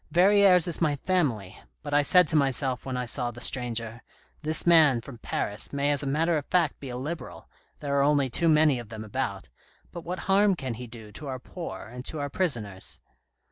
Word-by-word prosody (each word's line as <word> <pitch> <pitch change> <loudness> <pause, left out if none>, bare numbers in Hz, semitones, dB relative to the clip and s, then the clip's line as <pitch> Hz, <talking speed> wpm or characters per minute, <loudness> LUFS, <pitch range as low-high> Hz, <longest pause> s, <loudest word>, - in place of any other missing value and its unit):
Verrieres 190 -1 +5
is 170 -1 -2
my 150 -3 +2
family, 135 - -1 0.2
but 145 -1 -5
I 145 - +5
said 180 +4 +4
to 160 - -1
myself 135 -2 0
when 130 -1 -3
I 125 - -2
saw 120 0 -1
the 120 0 -10
stranger, 120 -3 -2 0.2
' - - -35
This 155 +1 +2
man 160 -7 +6
from 120 0 -11
Paris 105 -1 -3
may 140 +1 0
as 145 - +1
a 140 - -3
matter 160 +3 +1
of 145 - -12
fact 170 -5 +1
be 135 - -8
a 125 - -5
Liberal, 155 +6 -7 0.3
there 140 -1 -2
are - - +4
only 140 -1 +3
too 165 +7 +1
many 150 -4 +4
of 120 -3 -10
them 110 -1 -7
about, 105 - -4 0.4
but 170 - -7
what 180 +2 -5
harm 195 +1 +3
can 130 -7 -4
he 125 +2 -8
do 110 -2 -11
to 145 +8 -8
our 130 -1 -4
poor 165 +6 -8
and 125 +3 -9
to 160 - -3
our 145 -1 -4
prisoners 115 - -3
140 Hz, 220 wpm, -27 LUFS, 120-160 Hz, 0.4 s, man